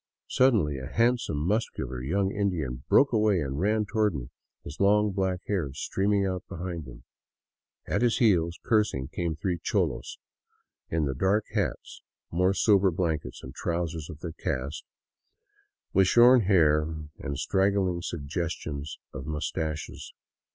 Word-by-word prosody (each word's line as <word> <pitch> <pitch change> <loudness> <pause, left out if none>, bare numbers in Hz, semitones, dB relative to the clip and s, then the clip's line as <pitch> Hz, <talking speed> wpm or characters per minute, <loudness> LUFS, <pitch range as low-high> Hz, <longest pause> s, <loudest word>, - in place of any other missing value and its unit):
Suddenly 105 - +3
a 65 - -6
handsome, 115 -4 +1
muscular 75 - -2
young 95 +9 0
Indian 80 -12 -2
broke 140 -2 +5
away 105 -4 +3
and 70 -2 -3
ran 105 +3 +1
toward 105 -3 +1
me, 65 -1 -6 0.3
his 75 - -9
long, 105 +1 +4
black 95 -2 -1
hair 90 -9 -1
streaming 100 +6 0
out 95 -1 -2
behind 85 -4 -5
him. - - -12 0.8
At - - -1
his 120 -2 +3
heels, 85 -7 +3
cursing, 105 - +1
came 85 -2 -2
three 85 +2 -2
cholos, - - -1 0.7
in 80 -2 0
the 70 - -1
dark 95 +10 +1
hats, - - -3 0.3
more 90 +3 +2
sober 100 +3 +4
blankets 80 -6 -2
and 65 - -8
trousers 85 -2 -3
of 75 -3 -9
their 85 - -4
caste, 70 +2 -4 1.1
with 95 -1 +5
shorn 120 +4 +7
hair 80 -6 +4 0.4
and 70 0 -4
straggling 95 -1 +1
suggestions 80 -2 -4 0.2
of 70 0 -7
mustaches. 75 0 -4
85 Hz, 135 wpm, -27 LUFS, 75-100 Hz, 1.1 s, shorn